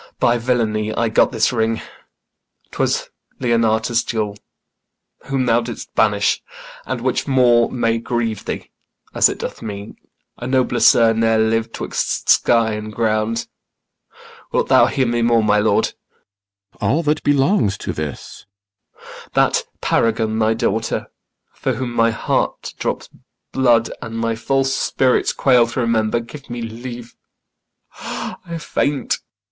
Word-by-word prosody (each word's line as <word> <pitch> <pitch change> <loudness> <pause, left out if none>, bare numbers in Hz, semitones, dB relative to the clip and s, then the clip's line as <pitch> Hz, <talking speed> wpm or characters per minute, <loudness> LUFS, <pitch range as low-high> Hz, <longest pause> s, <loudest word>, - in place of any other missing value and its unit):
By 120 0 +3
villainy 110 -3 0
I 115 -1 +1
got 110 - +3
this 115 0 +1
ring; 115 -1 0 0.9
'twas - - -1 0.3
Leonatus' 115 -1 +1
jewel, 105 -3 -2 0.9
Whom 135 -1 -1
thou 120 0 +3
didst 120 -1 -7
banish; 105 -2 +2 0.5
and 130 -1 -3
which 130 +2 -1
more 125 -3 +4
may 115 -2 0
grieve 115 -3 -2
thee, - - -5 0.4
As - - +5
it - - -4
doth - - -6
me 100 -1 -7 0.5
a 120 - -5
nobler 130 -2 +1
sir 115 0 +6
ne'er 115 0 +2
liv'd 110 +1 0
'Twixt - - -2
sky 115 -2 +4
and 105 0 -5
ground. 110 +1 0 1.0
Wilt - - 0
thou - - +6
hear 130 - 0
more, 120 -1 +2
my 105 0 +3
lord? 110 +1 +2
CYMBELINE. 100 0 -39
All 160 +6 +1
that 150 0 +1
belongs 135 - +2
to 90 - -4
this. 75 +2 -7 0.6
IACHIMO. - - -14
That - - +3 0.2
paragon, 110 -1 +1
thy 110 0 +2
daughter, 110 0 -1 0.4
For - - -2
whom 125 -2 -4
my 115 -1 +3
heart 110 - -2
drops - - -2 0.4
blood 120 -3 +3
and 115 0 -6
my 115 0 0
false 135 +4 0
spirits 130 -1 +1
Quail 125 -3 +4
to 120 - -4
remember 115 -1 +1
Give 140 +4 -12
me 120 -1 -5
leave, 120 +1 -8 0.8
I 170 -2 -6
faint. 145 -3 -1
115 Hz, 135 wpm, -19 LUFS, 110-125 Hz, 1.0 s, sir